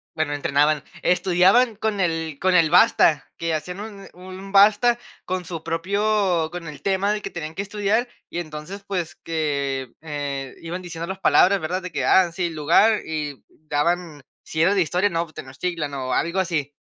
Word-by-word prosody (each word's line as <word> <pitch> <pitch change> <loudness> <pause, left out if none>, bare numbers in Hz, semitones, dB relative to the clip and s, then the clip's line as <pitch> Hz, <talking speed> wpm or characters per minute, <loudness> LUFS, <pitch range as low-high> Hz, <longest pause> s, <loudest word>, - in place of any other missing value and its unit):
bueno, 155 -2 -1
entrenaban, 145 +1 +1 0.2
estudiaban 190 +7 +4
con 210 -1 -2
el 165 -4 -1
con 185 0 +2
el 165 -3 +5
basta, 170 -5 +4
que 165 -1 -2
hacían 180 +5 -4
un 205 -2 -9
un 185 +2 -10
basta 215 +4 +5 0.3
con 185 0 -3
su 165 -2 -6
propio 185 0 0
con 175 -1 -7
el 145 -2 -9
tema 195 +4 +1
de 210 - -3
que - - -5
tenían 160 -1 -7
que 195 - -2
estudiar 210 +4 0 0.2
y 175 - -4
entonces, 155 +4 -7
pues, 180 -5 -3
que, 140 -5 -2
eh, 145 -3 -5
iban 170 +2 -5
diciendo 170 -2 -6
las 190 +1 -5
palabras, 195 +1 +4
¿verdad? 180 +4 -2
De 180 -1 -7
que, - - -2
ah, 185 -2 +4
sí, 175 0 -1
el 165 - -7
lugar 185 +9 +4
y 150 -3 -4
daban, 155 0 -2 0.2
si 160 - -3
era 190 +4 +4
de 195 - +3
historia, 180 +5 +1
no, 170 -2 -1
pues 155 - -14
Tenochtitlan, 150 +3 -4
o 130 -2 -3
algo 170 +7 0
así. 155 -6 -1
170 Hz, 185 wpm, -23 LUFS, 155-195 Hz, 0.3 s, el